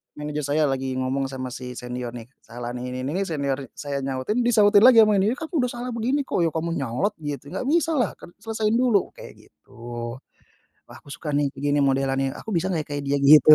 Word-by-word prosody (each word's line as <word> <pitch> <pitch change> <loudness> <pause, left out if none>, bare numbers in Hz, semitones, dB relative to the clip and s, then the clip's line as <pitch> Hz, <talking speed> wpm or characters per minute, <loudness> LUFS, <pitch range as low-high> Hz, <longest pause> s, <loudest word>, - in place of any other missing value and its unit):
manajer 150 0 -4
saya 155 - +3
lagi 135 -2 -1
ngomong 130 +1 -1
sama 130 -1 -5
si 125 0 -7
senior 125 0 -5
nih, 115 -2 -8
kesalahan 120 +1 -7
ini 125 +1 -5
ini 135 - -2
ini, - - 0
senior 140 -4 -1 0.2
saya 140 -1 -4
nyautin, 135 - -2
disahutin 210 -4 +5
lagi 235 -3 +9
sama 210 -2 +3
ini. 210 +6 +2
"Aku 320 +2 -3
udah 250 - +2
salah 245 +1 -5
begini 250 +5 0
kok." 265 - -2
"Ya 170 -1 +3
kamu 165 +1 -1
nyolot 135 - -1
gitu, 145 -2 -6
nggak 195 +7 -3
bisalah, 310 - +1
kan 175 - -13
selesaiin 220 0 -1
dulu!" 235 -7 +2
Kayak - - -14
gitu. 75 +12 -24 1.1
Wah, - - -14
aku - - -20
suka 150 +2 -5
nih 145 0 +2
kayak 135 +1 -9
gini 145 - +3
modelannya, 135 -1 +1
aku 220 - -7
bisa 180 +1 +1
nggak 165 -5 -1
ya, - - -31
kayak 145 0 -2
dia 140 0 +2
gitu. 150 +1 +8
145 Hz, 215 wpm, -24 LUFS, 135-210 Hz, 1.1 s, lagi